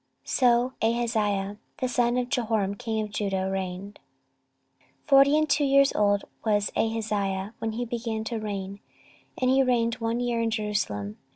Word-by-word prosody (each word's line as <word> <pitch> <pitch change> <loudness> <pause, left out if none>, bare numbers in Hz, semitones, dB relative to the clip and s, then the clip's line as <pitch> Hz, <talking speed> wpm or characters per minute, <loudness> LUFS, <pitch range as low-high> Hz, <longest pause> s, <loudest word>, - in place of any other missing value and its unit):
So 245 0 +2
Ahaziah 215 -3 0 0.2
the 255 - -1
son 245 -1 +1
of 250 -1 0
Jehoram 220 -5 0
king 220 0 -3
of 210 - -11
Judah 195 -2 -1
reigned. 190 +1 -5 1.1
14:022:002 - - -19
Forty 275 +1 +6
and 310 0 +2
two 290 0 +2
years 275 0 +4
old 205 -1 +2 0.2
was 205 -2 +1
Ahaziah 210 -3 -1
when 225 -1 -2
he 240 +2 -3
began 230 -2 -3
to 225 0 -3
reign, 200 -2 -5 0.6
and 255 0 +2
he 265 +1 +4
reigned 235 -3 +1
one 230 +1 -1
year 240 -1 0
in 230 - +1
Jerusalem. 205 - -2
225 Hz, 160 wpm, -26 LUFS, 205-245 Hz, 1.1 s, Forty